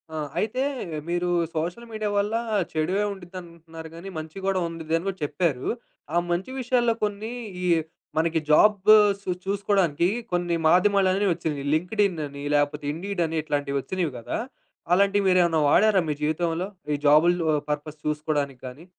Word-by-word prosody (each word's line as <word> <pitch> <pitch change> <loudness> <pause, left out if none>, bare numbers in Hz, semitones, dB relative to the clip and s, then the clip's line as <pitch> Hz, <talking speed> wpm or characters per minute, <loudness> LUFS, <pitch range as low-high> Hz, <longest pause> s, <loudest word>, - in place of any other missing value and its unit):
ఆ! - - -3 0.2
అయితే 225 +4 -1 0.5
మీరు 175 +1 0 0.3
సోషల్ 175 +9 -3
మీడియా 215 -1 -2
వల్ల 205 +2 +1 0.4
చెడువే 175 +6 0
ఉంటదనుకుంటున్నారు 170 -3 -10
కానీ, 175 +4 -8
మంచి 155 +2 -7
కూడా 195 -1 +1
ఉండుద్దని 165 +1 -2
కూడా 195 -1 -2
చెప్పారు. 145 -2 -1 0.5
ఆ - - +4
మంచి 180 +8 -2
విషయాల్లో 245 -2 +2
కొన్ని 210 +2 -2 0.3
ఈ - - -1 0.5
మనకి 165 0 +2
జాబు 210 +5 +6 0.3
సు 200 - -7 0.2
చూసుకోవడానికి 195 -5 +1 0.2
కొన్ని 175 -1 0
మాధ్యమాలనేవి 195 +2 +3
వచ్చినాయి. 150 -4 -4
'లింక్డిన్' 180 +1 +1
అని 140 0 -9
లేకపోతే 145 0 0
'ఇండీడ్' 180 +3 -2
అని 165 0 -4
ఇట్లాంటివి 145 -2 -2
వచ్చినయి 180 0 -2
కదా! 115 - -4 0.6
అలాంటివి 200 +2 +3
మీరేమైనా 175 -3 +4
వాడారా 205 +4 +5
మీ - - +1
జీవితంలో? 165 +3 -1 0.3
ఈ - - +2
జాబులు 160 +4 +5 0.3
పర్పస్ 150 +1 -3
చూసుకోవడానికి 150 -3 -1
గాని? 135 +7 -10
175 Hz, 140 wpm, -25 LUFS, 155-195 Hz, 0.6 s, జాబు